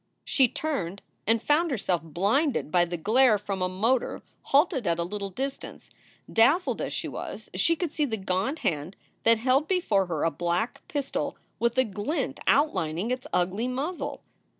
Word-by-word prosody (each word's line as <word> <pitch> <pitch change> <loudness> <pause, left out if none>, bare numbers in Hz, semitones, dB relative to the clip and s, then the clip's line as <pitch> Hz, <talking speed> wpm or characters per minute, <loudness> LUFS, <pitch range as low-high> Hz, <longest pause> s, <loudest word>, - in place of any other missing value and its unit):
" - - -48
She 265 -3 +4
turned 200 - -3 0.2
and 225 0 +3
found 325 +3 +3
herself 190 - 0
blinded 200 - 0
by 175 0 +4
the 175 0 -4
glare 220 +6 +4
from 200 -2 -4
a 185 - +1
motor 225 +7 0 0.2
halted 280 - +2
at 165 - +2
a 170 - 0
little 200 +2 -4
distance. 270 +8 -6 0.4
Dazzled 285 +11 +3
as - - -3
she - - -3
was, - - -7
she 335 0 +3
could 330 -2 -3
see 300 - +1
the 225 -5 -2
gaunt 190 - -1
hand 155 +3 -1 0.3
that 230 0 +6
held 260 +6 +2
before 220 - +2
her 160 -4 -2
a 165 - +2
black 175 +9 -1
pistol 290 -6 -3 0.2
with 235 +1 +1
a 260 - +6
glint 260 - -3
outlining 185 - +2
its 255 - -3
ugly 190 +7 0
muzzle. 280 +8 -3
225 Hz, 175 wpm, -27 LUFS, 185-275 Hz, 0.4 s, that